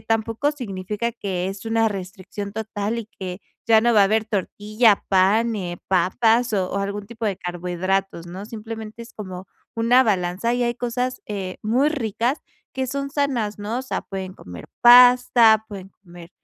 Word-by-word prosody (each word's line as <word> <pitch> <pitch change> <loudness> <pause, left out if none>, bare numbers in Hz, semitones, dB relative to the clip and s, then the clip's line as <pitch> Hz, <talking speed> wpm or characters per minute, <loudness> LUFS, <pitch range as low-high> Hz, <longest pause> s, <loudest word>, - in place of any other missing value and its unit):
tampoco 225 +5 0
significa 210 -3 -4
que 190 -5 -3
es 195 +3 -7
una 225 0 +2
restricción 195 +1 -7
total 220 0 -3
y 220 - -10
que 185 0 -6 0.3
ya 220 -1 +5
no 240 0 +3
va 215 - +5
a - - +7
haber 220 +2 +1
tortilla, 210 +1 +1
pan, 210 +5 +3
eh, 175 -3 -4
papas 225 +6 +2
o 185 -2 0
o - - -1
algún 200 +1 -4
tipo 230 0 -5
de 195 -3 -1
carbohidratos, 180 0 -3
¿no? 185 +4 -8
Simplemente 225 0 -8
es 230 - -13
como 185 -3 -8 0.3
una 235 +3 +5
balanza, 195 +1 0
y 245 - 0
hay 240 0 0
cosas, 250 +1 -3
eh, 195 -3 -5
muy 250 +8 +2
ricas 245 -1 -1 0.3
que 260 0 -2
son 275 +2 -4
sanas, 255 -8 -1
¿no? 210 +3 -3
O - - -8
sea, 260 - -3
pueden 190 -1 -6
comer 90 - -11 0.2
pasta, 245 -2 +7
pueden 195 -2 -9
comer 175 -2 -13
215 Hz, 170 wpm, -22 LUFS, 190-235 Hz, 0.3 s, a